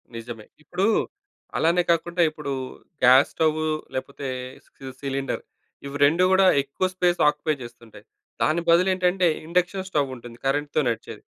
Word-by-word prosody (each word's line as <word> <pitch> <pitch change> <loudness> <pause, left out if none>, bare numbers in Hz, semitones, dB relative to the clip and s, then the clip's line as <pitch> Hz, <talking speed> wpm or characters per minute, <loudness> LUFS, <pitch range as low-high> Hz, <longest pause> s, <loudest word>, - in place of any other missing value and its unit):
నిజమే. 115 -1 -8 0.2
ఇప్పుడు 180 +5 -1 0.7
అలానే 170 +2 +3
కాకుండా 170 +1 0
ఇప్పుడు 150 -2 -6 0.5
గ్యాస్‌స్టవ్వు 155 +5 +4 0.3
లేపోతే 140 +1 -5 0.4
సి 135 -1 -11
సిలిండర్ 135 -1 -3 0.4
ఇవి 140 0 -7
2 165 +5 +3
గూడా 190 0 +5 0.2
ఎక్కువ 140 +7 -2
స్పేస్ 175 -1 +1
ఆక్యుపై 150 +1 +1
చేస్తుంటాయి. 120 -1 -13 0.4
దాని 165 +2 +2
బదులు 175 +3 +5
ఏంటంటే, 180 0 +2 0.2
ఇండక్షన్ 180 +2 0
స్టోవ్ 145 -6 0
ఉంటుంది 120 -1 -12
కరెంట్‌తో 145 +2 0
నడిచేది. 115 -1 -5
150 Hz, 125 wpm, -24 LUFS, 135-175 Hz, 0.7 s, గూడా